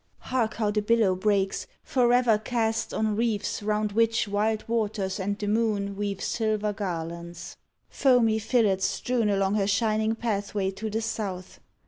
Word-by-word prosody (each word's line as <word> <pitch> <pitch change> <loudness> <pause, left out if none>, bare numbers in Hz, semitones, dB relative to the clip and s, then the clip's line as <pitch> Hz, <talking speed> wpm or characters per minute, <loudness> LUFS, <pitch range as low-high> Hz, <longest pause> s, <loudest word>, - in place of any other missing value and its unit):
Hark 240 -4 -1
how 215 -2 0
the 210 0 0
billow 215 -2 +3
breaks, 195 0 0 0.2
Forever 245 -3 +3
cast 225 0 -1
On 215 -1 0
reefs 220 -2 -1
round 210 0 0
which 225 +1 +2
wild 210 +2 0
waters 210 -4 -1
and 200 +1 -2
the 210 - -4
moon 205 -2 0
Weave 200 -1 -3
silver 215 -2 0
garlands 170 -3 -5 0.2
— - - -48
foamy 240 -5 +4
fillets 215 -4 +2
strewn 240 -4 0
Along 195 -1 +1
her 200 -2 +1
shining 215 +2 +1
pathway 205 -3 -2
to 205 +3 -5
the 220 +2 -2
South! 195 -5 -4
210 Hz, 150 wpm, -26 LUFS, 200-225 Hz, 0.2 s, foamy